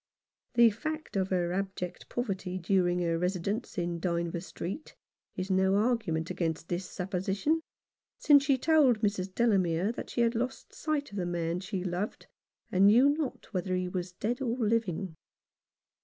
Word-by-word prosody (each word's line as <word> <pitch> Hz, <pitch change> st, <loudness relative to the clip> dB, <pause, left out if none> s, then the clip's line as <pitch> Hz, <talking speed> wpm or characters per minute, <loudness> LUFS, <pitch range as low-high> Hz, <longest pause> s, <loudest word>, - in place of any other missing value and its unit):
The 235 Hz, -1 st, +7 dB
fact 310 Hz, +7 st, -5 dB
of 190 Hz, -1 st, +1 dB
her 175 Hz, -2 st, 0 dB
abject 190 Hz, -2 st, -4 dB
poverty 195 Hz, -6 st, -3 dB
during 180 Hz, 0 st, +2 dB
her 165 Hz, -1 st, 0 dB
residence 190 Hz, +5 st, -2 dB
in 175 Hz, -1 st, -1 dB
Dynevor 170 Hz, -1 st, -1 dB
Street 190 Hz, -, -6 dB, 0.4 s
is 185 Hz, +1 st, -3 dB
no 190 Hz, +1 st, +3 dB
argument 205 Hz, -8 st, +1 dB
against 165 Hz, -1 st, -2 dB
this 180 Hz, +1 st, -3 dB
supposition, 195 Hz, -, -1 dB, 0.6 s
since 285 Hz, -2 st, +6 dB
she 275 Hz, -2 st, +3 dB
told 275 Hz, -6 st, +4 dB
Mrs. 195 Hz, -3 st, 0 dB
Delamere 195 Hz, -4 st, +2 dB
that -, -, -7 dB
she 240 Hz, -, -1 dB
had 230 Hz, 0 st, +3 dB
lost 250 Hz, +3 st, -3 dB
sight 300 Hz, -2 st, -2 dB
of 205 Hz, -, -7 dB
the 180 Hz, -2 st, -1 dB
man 170 Hz, 0 st, -1 dB
she 190 Hz, -1 st, -4 dB
loved, 185 Hz, +3 st, -3 dB, 0.5 s
and 190 Hz, +2 st, +5 dB
knew 245 Hz, +7 st, +7 dB
not 285 Hz, -6 st, -3 dB
whether 185 Hz, 0 st, -1 dB
he 180 Hz, 0 st, -1 dB
was 180 Hz, 0 st, -4 dB
dead 235 Hz, +8 st, -2 dB
or 245 Hz, -2 st, -1 dB
living. 205 Hz, -7 st, 0 dB
190 Hz, 155 wpm, -30 LUFS, 180-235 Hz, 0.6 s, The